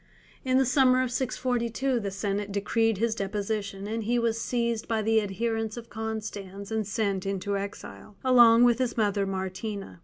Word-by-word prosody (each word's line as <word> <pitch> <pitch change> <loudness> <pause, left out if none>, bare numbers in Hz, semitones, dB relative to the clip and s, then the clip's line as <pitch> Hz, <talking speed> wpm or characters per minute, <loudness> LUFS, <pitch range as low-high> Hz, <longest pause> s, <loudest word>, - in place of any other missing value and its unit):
In 255 0 +2
the 265 - +4
summer 255 0 +4
of 250 - -3
642 250 0 -1
the 200 -3 -3
senate 200 +1 -3
decreed 220 +2 +1
his 230 +2 +1
deposition, 200 -1 -3
and 225 +2 -3
he 240 +3 +1
was 230 -1 0
seized 235 -2 -1
by 220 -1 0
the 220 0 +3
adherents 225 +2 -2
of 235 -1 -9
Constans 210 -2 -5
and 220 -2 -1
sent 200 -3 -1
into 195 0 -2
exile, 200 +1 -7
along 240 -2 +7
with 240 0 +4
his 250 -2 -1
mother 205 -2 +1
Martina. 190 +1 -5
220 Hz, 165 wpm, -27 LUFS, 200-235 Hz, -, along